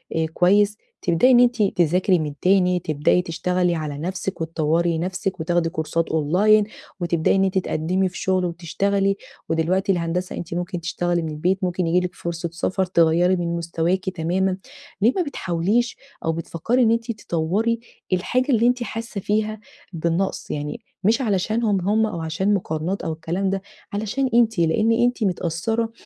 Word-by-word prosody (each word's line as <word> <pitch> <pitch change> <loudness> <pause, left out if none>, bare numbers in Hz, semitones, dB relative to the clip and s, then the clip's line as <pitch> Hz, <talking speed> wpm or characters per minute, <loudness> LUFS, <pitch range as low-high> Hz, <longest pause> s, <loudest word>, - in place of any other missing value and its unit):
أ 160 0 +1
كويس 205 +3 +3 0.2
تبدئي 180 +9 +4
إن 245 - +7
أنتِ 245 -2 +4
تذاكري 180 0 +2
من 150 -2 -3
تاني، 180 -1 +3
تبدئي 155 +2 +1
تشتغلي 180 +1 0
على 150 -3 -4
نفسِك 185 +3 -4
وتطوّري 165 +1 +1
نفسِك 185 +2 -3
وتاخدي 165 +1 +1
كورسات 165 0 -2
أونلاين، 185 +8 +4 0.4
وتبدئي 170 0 +1
إن 195 - +3
أنتِ 190 0 +1
تقدِّمي 185 +1 0
في 180 - -10
شغل 185 -1 +1
وتشتغلي. 195 +4 0 0.3
ودلوقتي 180 +5 +1
الهندسة 175 0 -2
أنتِ 170 - -6
ممكن 175 +1 -3
تشتغلي 175 +1 -1
من 160 - -3
البيت، 180 +6 -1
ممكن 180 -1 0
ييجي 175 +2 +3
لِك 180 - -6
فرصة 170 0 -4
سفر 185 +2 0
تغيّري 175 +1 +3
من 170 -1 -2
مستواكِ 170 +3 -1
تمامًا. 185 +2 0 0.4
ليه 230 +5 +4
ما 370 - +1
بتحاوليش 205 - -1 0.3
أو 165 - +2
بتفكّري 170 +9 -1
إن 225 - +4
أنتِ 230 +1 0
تطوّري 210 +4 -1 0.3
الحاجة 250 +9 +1
اللي 235 -1 +4
أنتِ 245 0 +1
حاسّة 225 -2 -5
فيها 215 +1 -1 0.3
بالنقص؟ 170 +3 -1
يعني 150 +10 -4 0.2
مش 225 +7 +3
علشانهم 210 -1 +1
هم 220 +1 +3
أو 205 -6 -4
عشان 175 +6 0
مقارنات 175 0 -2
أو 160 - -2
الكلام 170 +4 -2
ده، 195 0 -1 0.3
علشان 220 +6 -1
أنتِ. 225 -5 +3
لإن 170 +8 +3
أنتِ 240 0 +2
متأثّرة 195 +5 -1
180 Hz, 160 wpm, -22 LUFS, 170-205 Hz, 0.4 s, إن